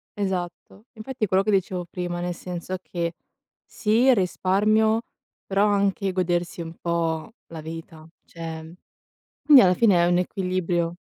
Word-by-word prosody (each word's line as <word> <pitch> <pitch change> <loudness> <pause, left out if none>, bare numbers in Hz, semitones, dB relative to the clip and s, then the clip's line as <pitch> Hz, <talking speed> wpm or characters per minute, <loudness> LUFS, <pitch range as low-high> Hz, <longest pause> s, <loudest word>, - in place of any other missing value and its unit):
Esatto, 190 +1 -4
infatti 230 +1 -4
è - - -6
quello 190 +1 +2
che 215 - 0
dicevo 185 -2 0
prima, 175 -1 -4
nel 175 0 -2
senso 180 +1 -6
che 170 -2 -3 0.5
sì, 220 +3 +1
il 260 - +7
risparmio, 215 +4 +2 0.4
però 200 +1 +2
anche 200 -1 +1
godersi 175 -1 -1
un 165 0 -7
po' 165 +2 -2
la 165 -1 -8
vita, 160 0 -9 0.2
cioè, 165 -1 -8 0.7
quindi 290 -4 +8
alla 185 -1 +5
fine 185 -4 +4
è - - +3
un 175 0 +3
equilibrio. 180 -2 -1
180 Hz, 145 wpm, -24 LUFS, 170-200 Hz, 0.7 s, quindi